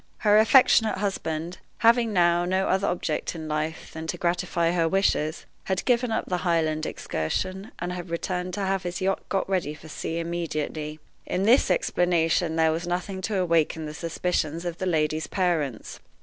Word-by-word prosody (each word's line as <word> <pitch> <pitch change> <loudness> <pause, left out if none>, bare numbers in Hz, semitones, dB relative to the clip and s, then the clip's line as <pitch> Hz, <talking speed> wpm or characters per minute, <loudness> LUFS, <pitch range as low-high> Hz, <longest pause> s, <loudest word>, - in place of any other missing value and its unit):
Her 210 0 +5
affectionate 225 -2 +5
husband, 175 -4 -3 0.2
having 230 0 +4
now 175 -2 +3
no 185 +2 0
other 190 +1 +1
object 170 -2 -2
in 160 -1 -6
life 155 +1 -3
than 160 0 -6
to - - -3
gratify 170 -1 0
her 170 -2 +1
wishes, 175 -4 +1 0.2
had 190 -1 -1
given 245 -1 +2
up 220 - -1
the 180 - -1
Highland 160 -3 0
excursion, 185 - -3
and 175 +1 -4
had 180 0 -6
returned 180 +1 -3
to 205 - -3
have 190 0 0
his 175 0 -4
yacht 195 0 0
got 195 - 0
ready 180 -6 -1
for 160 +1 -13
sea 165 +2 -4
immediately. 155 -2 -3 0.3
In 185 - -1
this 230 +3 +5
explanation 175 -2 +1
there 160 -1 +3
was 165 +2 -3
nothing 180 +2 -3
to 205 +1 -1
awaken 165 -3 +1
the 150 - -6
suspicions 165 0 -2
of 175 -1 -4
the 185 - -1
lady's 155 -2 0
parents. 165 - -1
175 Hz, 175 wpm, -26 LUFS, 160-190 Hz, 0.3 s, Her